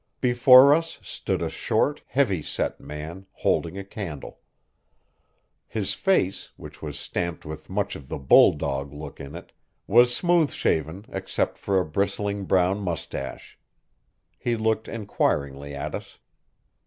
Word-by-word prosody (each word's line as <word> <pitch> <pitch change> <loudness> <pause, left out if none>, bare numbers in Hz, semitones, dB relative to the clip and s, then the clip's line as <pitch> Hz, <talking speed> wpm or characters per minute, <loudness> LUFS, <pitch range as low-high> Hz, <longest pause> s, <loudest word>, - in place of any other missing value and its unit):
Before 125 +2 +7
us 165 +2 -1
stood - - -3
a - - -1
short, 145 - 0
heavy 115 - +1
set - - -3
man, 80 +6 -8
holding 85 +3 0
a 100 - -4
candle. 95 -8 -7 1.3
His 105 -4 -1
face, 185 - +1
which - - -11
was 75 -2 -6
stamped 85 +2 -4
with 75 0 -8
much 100 +1 -1
of 65 - -11
the - - -3
bulldog 70 0 +4
look 75 +1 -9
in 70 +1 -8
it, - - -10 0.3
was 120 +3 +5
smooth 175 -2 +3
shaven 80 +6 -1
except 95 0 -2
for 100 -1 +1
a 90 - 0
bristling 100 +4 -1
brown 95 +1 +2
mustache. 85 -6 -5 0.8
He 120 - 0
looked 110 0 0
inquiringly 70 -10 -2
at 70 - -4
us. - - -7
95 Hz, 135 wpm, -25 LUFS, 75-115 Hz, 1.3 s, Before